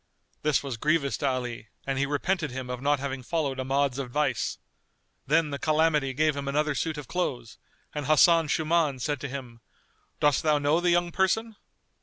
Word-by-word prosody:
This 150 -2 +1
was 135 -4 -4
grievous 150 +1 +1
to 140 - -1
Ali 125 -4 -3 0.2
and 135 -1 -1
he 140 - +1
repented 150 +3 -1
him 130 0 -5
of 125 0 -5
not 145 0 +2
having 135 -1 -4
followed 140 -1 -2
Ahmad's 135 0 0
advice. 135 -2 -1 0.7
Then 155 +1 +2
the 140 - -4
Calamity 155 -3 +2
gave 155 +1 +2
him 140 -1 -4
another 150 +2 +1
suit 155 +3 -2
of 145 -4 -7
clothes 125 -11 -3 0.3
and 150 -2 -4
Hasan 165 +1 +5
Shuman 155 -2 +1
said 145 +4 -2
to 140 - -4
him, 125 -4 -8 0.6
"Dost 145 -3 +3
thou 155 -1 +3
know 145 +3 +2
the 175 - +2
young 175 0 +2
person?" 215 +5 0
145 Hz, 180 wpm, -27 LUFS, 135-155 Hz, 0.7 s, Hasan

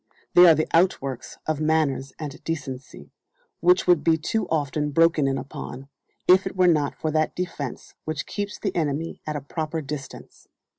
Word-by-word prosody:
They 180 0 +9
are 165 - +8
the 155 - 0
outworks 150 -7 0
of 155 -1 -1
manners 155 -4 +1
and 150 -2 -7
decency, 135 - -6 0.5
which 180 +2 +4
would 175 -4 +4
be 160 0 +4
too 215 +8 -2
often 150 -1 0
broken 165 -1 +3
in 135 0 0
upon, 135 0 -7 0.4
if 185 +1 +6
it - - -6
were 185 -1 +4
not 150 -4 +2
for 155 - -2
that 155 0 0
defence 165 -8 -5
which 155 -2 -3
keeps 205 0 -4
the 195 -3 -3
enemy 160 0 -2
at 155 - -2
a 145 - -3
proper 155 +3 -4
distance. 145 -2 -8
155 Hz, 175 wpm, -24 LUFS, 140-165 Hz, 0.5 s, They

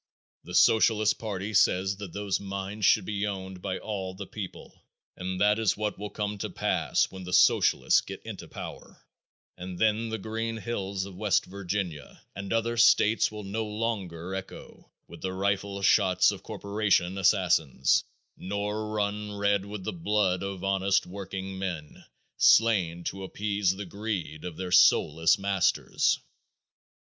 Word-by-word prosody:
The - - -6
Socialist 110 -1 +4
party 105 -1 -4
says 95 -1 +3
that 100 -3 -7
those 100 -1 -2
mines 100 +1 -4
should - - +4
be 105 -1 -2
owned 95 -2 -6
by 95 - -3
all 95 -3 -5
the 100 +1 -7
people 100 -1 -9 0.3
and 90 0 -4
that 105 +1 +3
is 110 -4 +1
what 105 -1 -3
will 105 0 -5
come 105 -1 -4
to - - -3
pass - - 0
when 95 -1 -8
the 90 - -7
socialists 95 - +4
get - - -8
into - - -7
power, - - -10 0.5
and 90 0 -7
then 110 +2 +1
the 110 - -2
green 115 +2 -4
hills 100 -4 -3
of 100 - -9
West 105 +1 +1
Virginia 95 -5 -5
and 100 0 -6
other 115 +1 0
states 115 -1 +4
will 105 -1 -7
no 105 +3 -3
longer 105 -5 -3
echo 95 0 -9 0.2
with 85 0 -12
the 95 0 -3
rifle 100 +1 -1
shots 95 -1 +4
of 100 -2 -8
corporation 100 -3 0
assassins, 85 -8 +3 0.3
nor 105 +2 -3
run 105 0 -2
red 100 -1 +1
with 100 -1 -7
the - - -3
blood 105 - 0
of 100 -1 -5
honest 95 0 +2
workingmen 95 -4 -6 0.3
slain 95 -7 +4
to 95 +3 -4
appease 100 0 -1
the 100 +1 -6
greed 95 -6 -5
of 90 -3 -6
their 95 -1 -5
soulless 80 0 +5
masters. 100 -3 +1
100 Hz, 150 wpm, -28 LUFS, 95-105 Hz, 0.5 s, soulless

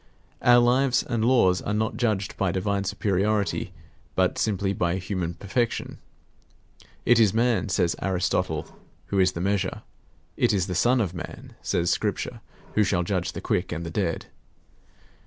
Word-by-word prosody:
Our 120 0 +6
lives 125 +2 +3
and 115 -2 -1
laws 115 -7 +4
are 105 - -2
not 110 +1 -1
judged 105 -5 -1
by 95 -3 0
divine 100 +2 -1
superiority, 100 +2 0 0.4
but 95 -1 +1
simply 100 -2 0
by 85 -2 0
human 90 -2 -3
perfection. 115 +6 -2 1.1
It 120 0 +5
is 110 -3 +4
man, 115 -5 +2
says 90 -2 +1
Aristotle, 90 -4 -1 0.3
who 100 - +1
is 95 0 +4
the 85 - -4
measure. 95 0 -1 0.5
It 115 -2 +3
is 95 -4 +1
the 90 - -4
Son 120 +7 +3
of 90 -5 -2
Man, 85 - -8
says 85 0 0
Scripture, - - -2 0.3
who 105 - +4
shall 90 -3 +1
judge 90 0 -2
the - - -6
quick 90 - -1
and 85 -1 -4
the 85 - -5
dead. 85 -3 -1
95 Hz, 155 wpm, -25 LUFS, 90-110 Hz, 1.1 s, Our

